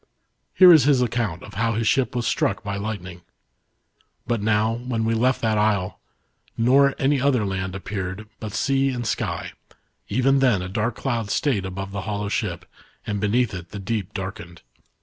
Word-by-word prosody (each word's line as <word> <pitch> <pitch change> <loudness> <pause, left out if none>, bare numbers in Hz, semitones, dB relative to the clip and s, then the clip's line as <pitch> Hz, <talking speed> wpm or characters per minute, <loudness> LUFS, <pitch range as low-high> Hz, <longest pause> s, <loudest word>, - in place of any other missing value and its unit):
Here 180 -2 +9
is 150 -6 +6
his 140 -3 +4
account 115 -8 -2
of - - -11
how 115 +3 0
his 110 +1 -1
ship 130 +1 +1
was 120 -1 -1
struck 100 - 0
by 100 -1 -3
lightning: 100 -4 -5 0.5
" - - -43
But 115 -3 -1
n^>w, 110 +3 0
when 115 -3 -1
we 115 - +1
left 125 +3 +1
that 110 -1 +2
isle, 105 -3 0 0.6
nor 135 +4 +4
any 140 +2 +2
ether 130 -5 +2
land 95 -1 -3
appeared 95 +1 -5
but 110 -2 -6
sea 135 0 +1
and 120 -2 -3
sky, - - -2 0.6
even 135 +5 +2
+hen 120 -9 +3
a 90 - -5
dark 110 +4 -1
cloud 115 -6 -2
stayed 105 -6 0
above 95 +1 -6
the 100 0 -4
hollow 100 +1 -3
ship, - - -2 0.4
and 105 -1 -2
beneath 110 +1 +1
it, 90 -2 -7
the 105 - -8
deep 100 -1 -3
darkened. 95 -3 -7
110 Hz, 180 wpm, -23 LUFS, 100-125 Hz, 0.6 s, Here